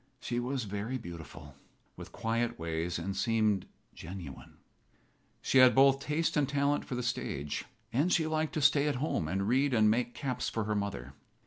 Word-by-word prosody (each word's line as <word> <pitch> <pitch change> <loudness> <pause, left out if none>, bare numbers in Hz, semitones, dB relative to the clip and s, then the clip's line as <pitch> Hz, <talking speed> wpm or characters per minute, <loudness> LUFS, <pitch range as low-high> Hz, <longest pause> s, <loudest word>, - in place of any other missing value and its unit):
She 120 0 -2
was 125 +1 -2
very 105 +5 -3
beautiful, 80 - -10 0.4
with - - -10
quiet 115 +1 -1
ways, 85 +1 -2
and 95 +4 -4
seemed 110 -2 +1 0.3
genuine. 85 -5 -9 0.9
She 135 - +4
had 130 -1 +7
both 135 0 +6
taste 150 +4 -1
and 145 -3 +2
talent 140 +1 +1
for 125 - -4
the 125 - -2
stage, 75 - -3 0.3
and 150 +9 +2
she 160 - +3
liked 155 0 -1
to 155 - 0
stay 145 0 +4
at 145 - 0
home 125 - -1
and 95 +4 -1
read 130 +3 +2
and 110 -1 +5
make 120 +1 -1
caps 135 -4 -2
for 115 - -2
her 105 +1 -1
mother. 100 -11 -3
120 Hz, 180 wpm, -31 LUFS, 95-140 Hz, 0.9 s, had